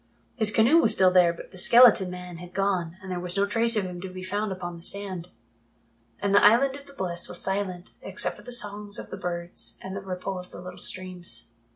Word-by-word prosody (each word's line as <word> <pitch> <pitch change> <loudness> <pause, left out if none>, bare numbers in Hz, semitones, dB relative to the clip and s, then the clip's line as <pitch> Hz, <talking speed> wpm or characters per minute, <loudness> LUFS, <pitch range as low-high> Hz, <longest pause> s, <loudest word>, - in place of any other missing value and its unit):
His 220 -4 +5
canoe 230 +10 +4
was 225 -9 +3
still 185 -3 +4
there, 180 -2 +5
but 170 - -11
the 185 - -4
skeleton 235 -3 +7
man 180 -1 -8
had 180 +1 -12
gone 185 -3 -1
and 190 - -7
there 180 - -3
was 180 +1 -5
not 200 - +3
a - - 0
trace 230 +2 +1
of 210 - +1
him 180 -1 -7
to 190 - -6
be 185 0 -9
found 205 +2 -2
upon 175 -2 -6
the 165 - -13
sand. 190 -3 -4 0.9
And 200 0 -1
the 205 - +5
Island 250 +6 +5
of 280 0 -12
the 280 - -14
Blest 175 -7 -3
was 175 - 0
silent 190 -2 -2
except - - -2
for - - -13
the 245 - -10
songs 210 -3 +1
of - - -9
the - - -6
birds 175 -1 -3
and 190 0 -6
the 195 - -5
ripple 185 0 -5
of 180 0 -11
the - - -11
little 180 0 -10
streams. 175 - -2
185 Hz, 240 wpm, -26 LUFS, 180-205 Hz, 0.9 s, skeleton